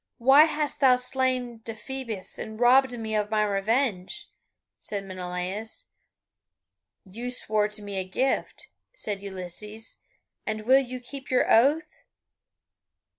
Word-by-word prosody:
"Why 270 +5 +7
hast 300 -2 -2
thou 260 -3 +6
slain 250 -2 -1
Deiphobus 225 -2 -6
and 220 0 -6
robbed 250 +1 +5
me 220 -1 -4
of 210 -1 0
my 215 -1 +2
revenge?" 205 0 0 0.5
said 200 -2 -4
Menelaus. 185 - -4 1.2
"You 230 +6 -6
swore 215 -4 +1
to 210 - -3
give - - -10
me 200 -1 -5
a 190 - 0
gift," 255 +9 -2 0.3
said 205 - -3
Ulysses, 200 +3 -6 0.4
"and 215 0 -3
will 260 +5 +5
you 255 -1 -6
keep 270 +2 -9
your 255 - +2
oath?" 285 +8 +3
225 Hz, 125 wpm, -27 LUFS, 205-260 Hz, 1.2 s, Why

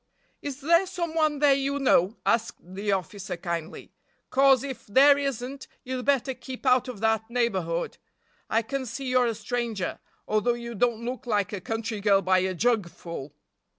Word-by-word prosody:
"Is 285 -1 -6
there 335 +6 +4
some 345 -3 -3
one 310 -2 +2
there 285 -1 +5
you 275 +1 0
know?" 225 -6 +3
asked 230 0 +1
the 195 +4 -4
officer 195 0 -3
kindly, 170 -2 -5 0.4
"'cause 270 -1 +5
if 270 -2 -7
there 275 +7 +7
isn't 275 -1 -4 0.2
you'd 255 -1 -4
better 275 -2 +2
keep 255 +2 -9
out 255 -1 +4
of 240 -5 -7
that 220 0 +1
neighborhood. 190 -9 -1 0.5
I 225 +1 +2
can 265 +3 -4
see 250 +4 -5
you're 255 -1 +3
a 230 - -1
stranger, 225 -2 -3 0.3
although 215 +3 +2
you 235 0 -6
don't 235 +1 0
look 245 0 -5
like 205 -3 0
a 200 - -4
country 225 +1 -3
girl 200 -1 +4
by 185 +1 +4
a 185 0 -1
jug 220 -2 +1
full!" 165 -4 -8
235 Hz, 175 wpm, -26 LUFS, 200-270 Hz, 0.5 s, there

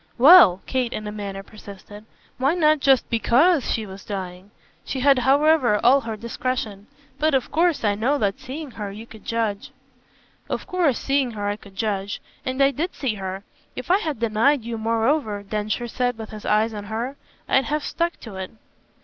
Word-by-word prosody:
"Well," 245 - +8
Kate 255 -2 -1
in 215 - -5
a 210 - -4
manner 200 -2 -6
persisted, 205 0 -12 0.3
"why 275 +6 +2
not 310 -3 +3
just 270 -2 +3
BECAUSE 255 - +3
she 220 - -1
was 190 -1 -10
dying?" 185 -1 -6 0.3
She 265 - -4
had 275 -1 +5
however 270 -3 +3
all 270 +3 +6
her 225 -2 -5
discretion. 230 -3 -4 0.3
"But 310 -2 +2
of 260 - -1
course 335 -2 +2
I 205 -2 +2
know 240 +8 +1
that 200 -6 -1
seeing 280 +2 -7
her 205 -3 -6
you 215 +3 -9
could 220 -2 -14
judge." 220 -3 -2 0.8
"Of - - -3
course 350 - +1
seeing 275 -2 0
her 205 -1 -3
I 205 - -1
could 200 -2 -16
judge. 200 -1 -2 0.2
And 260 +1 0
I 275 - +4
did 330 +6 -3
see 260 -6 -1
her! 190 -1 -6 0.3
If - - -4
I 380 - +5
had 310 - -3
denied 230 +4 +2
you 230 -1 -5
moreover," 225 -1 0
Densher 215 +3 -3
said 245 0 -1
with 220 -1 -8
his 215 -1 -9
eyes 215 +2 +2
on 205 -1 -6
her, 230 +6 -4 0.3
"I'd 265 - +3
have 300 0 -2
stuck 340 0 -2
to 215 -5 -9
it." 190 0 -5
230 Hz, 190 wpm, -23 LUFS, 210-275 Hz, 0.8 s, Well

